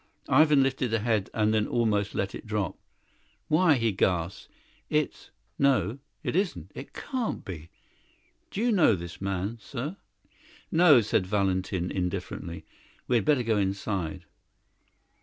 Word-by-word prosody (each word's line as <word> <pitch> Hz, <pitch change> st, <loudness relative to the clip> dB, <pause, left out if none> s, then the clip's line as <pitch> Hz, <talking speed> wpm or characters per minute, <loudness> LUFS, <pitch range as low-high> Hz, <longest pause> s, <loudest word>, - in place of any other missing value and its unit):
Ivan 150 Hz, 0 st, +6 dB
lifted 135 Hz, -2 st, 0 dB
the 115 Hz, -1 st, 0 dB
head, 110 Hz, -3 st, 0 dB
and 110 Hz, 0 st, +1 dB
then 105 Hz, -1 st, +2 dB
almost 105 Hz, -4 st, 0 dB
let 100 Hz, -, -1 dB
it -, -, -8 dB
drop. 105 Hz, -4 st, -1 dB, 0.7 s
"Why," 160 Hz, 0 st, +5 dB
he 115 Hz, -3 st, +1 dB
gasped, 90 Hz, -2 st, -1 dB, 0.4 s
"it's 150 Hz, -1 st, -1 dB, 0.3 s
no, 130 Hz, -4 st, +2 dB, 0.2 s
it -, -, -2 dB
isn't; 135 Hz, -, -1 dB
it 135 Hz, -, -9 dB
can't 255 Hz, -5 st, -3 dB
be. 85 Hz, -3 st, -7 dB, 0.8 s
Do 200 Hz, -, -4 dB
you 240 Hz, +1 st, +3 dB
know 175 Hz, -, +5 dB
this 85 Hz, 0 st, -8 dB
man, 95 Hz, +4 st, -2 dB
sir?" 140 Hz, -, -5 dB, 0.7 s
"No," 160 Hz, -7 st, +7 dB
said 100 Hz, -3 st, 0 dB
Valentin 95 Hz, -2 st, 0 dB
indifferently; 90 Hz, -3 st, -4 dB, 0.4 s
"we 125 Hz, -, +3 dB
had 110 Hz, -, -1 dB
better 145 Hz, -5 st, +3 dB
go 110 Hz, -2 st, +1 dB
inside." 95 Hz, -4 st, -2 dB
110 Hz, 140 wpm, -28 LUFS, 95-135 Hz, 0.8 s, No